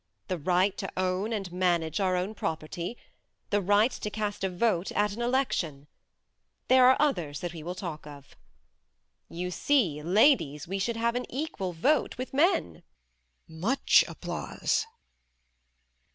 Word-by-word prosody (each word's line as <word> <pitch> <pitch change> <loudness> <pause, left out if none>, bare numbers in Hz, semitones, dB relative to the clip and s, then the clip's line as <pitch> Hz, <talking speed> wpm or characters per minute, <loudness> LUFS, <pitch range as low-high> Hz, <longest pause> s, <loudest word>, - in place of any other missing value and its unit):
The 185 -2 -2
right 185 +5 +2
to 195 - -4
own 185 +3 0
and 195 -5 -3
manage 175 -3 0
our 185 -2 +1
own 185 +4 -2
property. 170 +3 -4 0.5
The 205 0 +2
right 205 +5 +3
to 210 - -5
cast 210 -2 -3
a 190 - +1
vote 180 -1 0
at 205 0 +1
an 230 - -6
election. 235 - -1 0.8
There 255 -1 +7
are 260 - +6
others 175 - 0
that 175 -1 -4
we 165 - -8
will 175 +3 -5
talk 165 -5 -6
of. 140 -1 -13 0.9
You 180 +2 -4
see 185 - +1
ladies 170 - +3
we 195 +2 -3
should 230 +4 -1
have 235 +1 +1
an 245 +1 -4
equal 260 - -3
vote 280 - +1
with 255 +2 -6
men. 275 - +1 0.7
(Much 185 +12 +3
applause). 175 +1 -2
185 Hz, 145 wpm, -28 LUFS, 170-230 Hz, 0.9 s, There